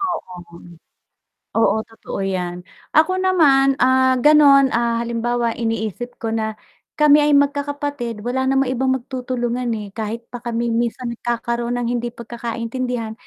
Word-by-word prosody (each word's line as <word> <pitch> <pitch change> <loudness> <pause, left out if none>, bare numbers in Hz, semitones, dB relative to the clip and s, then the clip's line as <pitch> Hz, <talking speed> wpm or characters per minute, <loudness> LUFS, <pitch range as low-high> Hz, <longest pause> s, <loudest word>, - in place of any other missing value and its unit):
Oo. 180 - -5 1.0
Oo, 225 - +3
totoo 225 -3 -7
yan. 180 -2 -3 0.3
Ako 320 +5 +3
naman, 290 -8 +4
ah, 260 +1 +4
ganun 280 -1 +6
ah, 235 -1 0
halimbawa 235 0 -1
iniisip 225 +1 -4
ko 225 - -3
na, 220 -1 -1 0.4
kami 300 0 +6
ay 295 -1 +4
magkakapatid 285 -5 -1
wala 260 +2 -1
namang 270 -1 +2
ibang 260 +1 0
magtutulungan, 250 -1 -3
eh, 210 -1 -6
kahit 225 +1 -5
pa 245 - -6
kami 235 0 -2
minsan 235 +1 -2
nagkakaroon 235 0 -2
ng 240 -1 -2
hindi 240 0 -2
pagkakaintindihan, 235 0 -4
240 Hz, 130 wpm, -20 LUFS, 230-270 Hz, 1.0 s, ganun